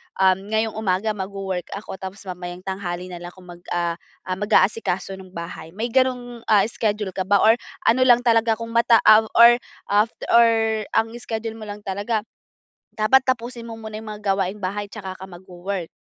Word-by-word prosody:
um, 190 +1 +2
ngayong 220 +1 0
umaga, 200 +1 0
magwo-work 195 -2 -4
ako, 200 -2 -8
tapos 190 +1 -8
mamayang 180 -1 -7
tanghali 185 -2 -5
na 175 - -7
lang 175 0 -8
ako 185 - -15
mag, 175 - -12 0.2
ah 170 0 -1 0.2
ah, 185 -1 -3
mag-aasikaso 195 -2 +1
nung 185 -1 -13
bahay. 170 0 -8
May 230 +3 -3
gano'ng, 250 -2 0
ah, 210 -3 +5
schedule 210 -3 -1
ka 185 0 -4
ba 200 0 +4
or 225 +2 +5 0.2
ano 255 +3 +3
lang 245 -1 +6
talaga 230 -1 +3
kung 230 +1 -7
mata 235 0 +4
av 215 +1 +7
or 235 +1 +8 0.3
af 210 +2 +4 0.2
or 225 -2 +4
ang 225 0 +2
schedule 225 -1 -5
mo 215 - -8
lang 205 0 -7
talaga, 205 +3 -2 0.7
dapat 220 +4 +5
tapusin 235 -1 -2
mo 225 - -7
muna 220 -1 -7
'yong 220 - -10
mga 210 - -15
gawaing-bahay 195 +1 -2
tsaka 195 -4 -7
ka 190 - -8
magwo-work? 180 0 -6
205 Hz, 180 wpm, -22 LUFS, 190-225 Hz, 0.7 s, or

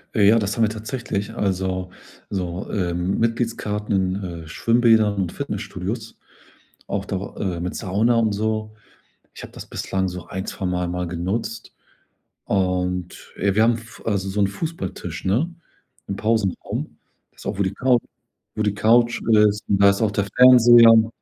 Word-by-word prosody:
Ja, 105 - +2
ja, 110 +3 +6
das 100 0 -2
haben 115 - +3
wir 110 - +3
tatsächlich, 110 -2 -4
also 95 -2 -2 0.4
so, 90 -1 -3
äh, 90 -4 -1
Mitgliedskarten 105 +2 -1 0.2
in, 85 -4 -6
äh, - - -13
Schwimmbädern 115 +2 +3
und 95 -3 -2
Fitnessstudios, 110 +5 -5 0.7
auch 100 -1 -3
da, 95 0 -5
äh, 90 -4 -3
mit 90 +1 -4
Sauna 105 +6 +1
und 110 -2 +2
so. 110 +1 -2 0.6
Ich - - -10
habe - - -10
das - - -10
bislang 95 0 -2
so 90 -1 -7
1, 95 +1 -5
2 95 - -6
Mal 90 -1 -1
mal 90 0 -3
genutzt 95 +7 -4 0.7
und, 90 -2 -2
äh, 100 0 0
wir 110 - +4
haben 120 +1 +4
'n - - -3
Fu 115 +1 -14
also 100 -3 -1
so 105 - -3
'n 100 - +4
Fußballtisch, 100 - -5
ne, 135 - +1 0.5
im 100 - -3
Pausenraum. 110 -3 -2 0.4
Das - - -18
ist - - -13
auch, 100 - -3
wo - - +3
die 95 +1 -2
Couch 125 +1 +2 0.5
wo 110 - -1
die 105 -1 +1
Couch 120 +2 +3
ist, 105 -1 +4
und 100 0 +2
da 100 - +8
ist 100 +3 0
auch 110 - +2
der 100 -1 -1
Fernseher 120 -2 +8
und. 110 0 +4
100 Hz, 175 wpm, -22 LUFS, 95-115 Hz, 0.7 s, da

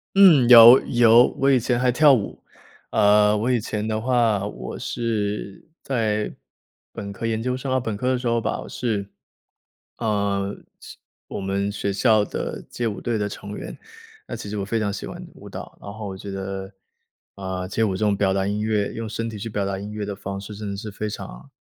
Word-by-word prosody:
嗯， 170 -11 +7
有 120 +1 +10
有， 120 -1 +6 0.2
我 135 +1 +3
以 130 - +4
前 120 +1 0
还 125 0 +3
跳 145 +3 +6
舞。 110 -6 -2 0.5
呃， 105 0 +4
我 110 +4 0
以 125 - +2
前 105 0 -3
的 110 0 -1
话， 115 -4 +1
我 60 -12 -6
是 105 -4 -3
在 110 -5 -1 0.6
本 100 - -7
科、 100 +3 -6
研 110 -1 -1
究 125 +2 -1
生 130 +1 -4
啊， 130 - +2
本 110 -4 -4
科 125 +4 -1
的 130 - +1
时 125 - -3
候 115 0 +2
吧， 110 - -2
我 - - -10
是 105 -5 -3 0.9
呃， 100 -3 -1 0.2
是 - - -12 0.3
我 - - -5
们 100 +1 -1
学 100 0 -2
校 110 +1 +3
的 - - -5
街 120 -1 -2
舞 100 -3 -4
队 120 -2 -1
的 105 -1 -1
成 100 0 -8
员。 - - -7 0.5
那 - - -5
其 - - -8
实 - - -4
我 - - -2
非 110 +4 -1
常 105 -2 -1
喜 - - -6
欢 - - -8
舞 - - -13
蹈， - - -9
然 100 - -8
后 105 0 -7
我 95 - -6
觉 100 +2 -9
得， 95 0 -5 0.6
啊， 95 -1 -5
街 110 +4 -1
舞 100 -4 +1
这 105 - -1
种 105 -1 +2
表 95 -1 +1
达 95 0 0
音 105 +1 -2
乐 105 -2 0
用 115 -1 -5
身 115 +1 -3
体 110 -2 -7
去 115 +3 -5
表 105 -1 -2
达 95 -1 -3
音 100 +1 -7
乐 105 -1 -4
的 100 0 -5
方 95 0 -6
式， 100 +2 -8
真 105 0 -6
的 100 - -4
是 105 +1 -6
非 105 +1 -4
常 60 - -9
105 Hz, 235 characters per minute, -23 LUFS, 100-115 Hz, 0.9 s, 有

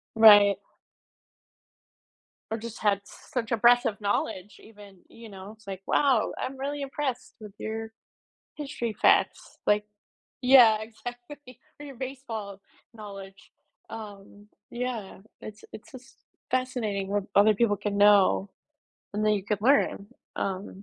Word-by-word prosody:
Right. 205 -3 +7 1.9
Or 225 - -2
just 230 0 -8
had 205 -2 +2
such 235 +2 -6
impressive 235 -1 +3
knowledge 205 -1 -2
even, 205 -3 -16
you 230 -1 -13
know, 195 +1 -10
it's 215 -2 -19
like, 190 -1 -6
"Wow, 265 -6 +2
I'm 265 +1 -5
really 285 +2 -4
impressed 275 -2 -4
with 210 -2 -10
your 220 0 -5 0.6
history 275 -7 -5
facts", - - +1
like 210 0 +3 0.6
yeah, 245 -4 +6
exactly, 245 +4 -10 0.2
or 295 - -8
your 275 -2 -10
baseball 230 -7 -7 0.3
knowledge. 195 -3 -11 0.4
Um 205 -2 -10 0.2
yeah, 240 -5 -5 0.2
it's 215 0 -11
it's 225 +9 -12
just 260 -2 -14 0.4
fascinating 225 -7 -1
what 205 -1 -1
other 210 +2 +5
people 205 -1 +2
can 200 +1 -3
know 200 - +4 0.6
and 210 +1 -1
then 215 0 +3
you 200 -2 -3
could 205 0 -2
learn, 245 -6 +2 0.3
um. 195 0 -5
215 Hz, 125 wpm, -27 LUFS, 200-245 Hz, 1.9 s, Right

